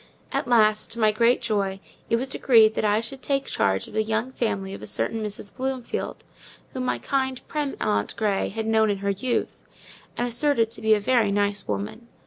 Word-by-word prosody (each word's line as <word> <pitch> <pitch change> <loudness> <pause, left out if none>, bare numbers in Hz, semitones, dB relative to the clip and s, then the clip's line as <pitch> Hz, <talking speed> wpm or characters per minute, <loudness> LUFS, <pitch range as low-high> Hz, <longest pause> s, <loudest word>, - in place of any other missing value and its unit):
At - - -1
last, 215 -3 +3
to 235 - -8
my 215 -1 +4
great 235 +3 +3
joy, 200 -4 0 0.3
it - - +3
was 250 +3 -1
decreed 225 -5 +5
that - - -2
I 210 +1 +3
should 260 +4 -6
take 275 0 0
charge 95 0 0
of - - -13
the 220 - +2
young 220 +3 -1
family 195 -6 -2
of - - -8
a - - -7
certain 225 -1 -1
Mrs. 205 -1 -7
Bloomfield; 260 -2 -3 0.5
whom 255 -1 -3
my - - 0
kind, 265 -2 -1
prim 295 -2 -2
aunt 105 0 0
Grey 210 -3 0
had 220 +2 -4
known 220 -1 +3
in 200 - 0
her 200 - +2
youth, 240 +6 -1 0.6
and 245 - 0
asserted 235 -1 +1
to - - -8
be 220 0 +5
a - - 0
very 220 -1 +2
nice 205 0 0
woman. 220 +3 -4
220 Hz, 205 wpm, -25 LUFS, 205-245 Hz, 0.6 s, decreed